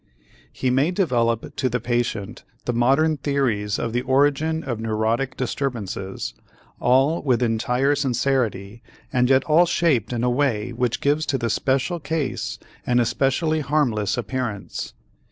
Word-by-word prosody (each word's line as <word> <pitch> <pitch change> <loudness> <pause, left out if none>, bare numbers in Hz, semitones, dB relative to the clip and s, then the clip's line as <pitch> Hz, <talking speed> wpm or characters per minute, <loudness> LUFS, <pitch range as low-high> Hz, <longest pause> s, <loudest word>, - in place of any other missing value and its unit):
He 130 - -1
may 135 +5 +3
develop 120 - 0
to 130 -3 +1
the 125 +1 -1
patient 120 -2 -2 0.2
the 120 - 0
modern 135 +7 +3
theories 125 -8 0
of 115 -1 -3
the 120 - +1
origin 145 +5 +1
of 120 -4 -3
neurotic 115 +4 -1
disturbances, 115 - -3 0.5
all 135 +6 +3
with 125 -3 +1
entire 125 +4 +1
sincerity 125 -6 -1 0.3
and 125 -1 +3
yet 135 0 +4
all 165 +3 +4
shaped 145 - +1
in 120 -1 -2
a - - +2
way 120 -4 0
which 120 0 -1
gives 150 +2 +1
to 135 - +1
the 115 -3 -1
special 135 - 0
case 150 -2 -3 0.3
an 125 0 +2
especially 135 +6 +1
harmless 135 -9 0
appearance. 120 -5 -4
125 Hz, 140 wpm, -23 LUFS, 115-140 Hz, 0.5 s, yet